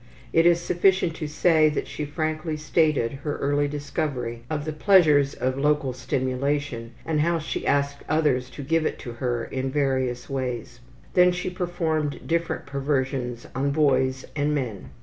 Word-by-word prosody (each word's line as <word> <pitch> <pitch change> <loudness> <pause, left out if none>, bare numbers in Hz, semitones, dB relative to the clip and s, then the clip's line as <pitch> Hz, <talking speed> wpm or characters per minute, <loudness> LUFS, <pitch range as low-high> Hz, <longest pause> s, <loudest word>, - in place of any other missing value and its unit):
It 165 +1 +5
is 170 -1 +5
sufficient 175 0 +2
to 155 - -3
say 155 +1 +4
that 150 - -2
she 150 - -4
frankly 155 +1 -2
stated 155 -5 +2
her 150 -1 -3
early 145 +1 +1
discovery 140 -5 -3
of 150 -2 -2
the 155 - -3
pleasures 155 -5 +4
of 130 +1 -1
local 145 -2 +1
stimulation 130 -1 -2
and 155 -2 +1
how 170 +2 +2
she 155 - -4
asked 140 0 +1
others 145 -5 +2
to 145 - -5
give 165 +3 +1
it - - -4
to 120 - -7
her 120 -1 -2
in 130 0 -3
various 130 -3 0
ways. 125 -2 -4 0.3
Then 180 -1 +6
she 180 0 -3
performed 165 -5 -2
different 170 0 -1
perversions 135 -3 -2
on 135 +2 0
boys 130 -3 +2
and 150 0 +1
men. 110 - -4
145 Hz, 160 wpm, -25 LUFS, 130-155 Hz, 0.3 s, Then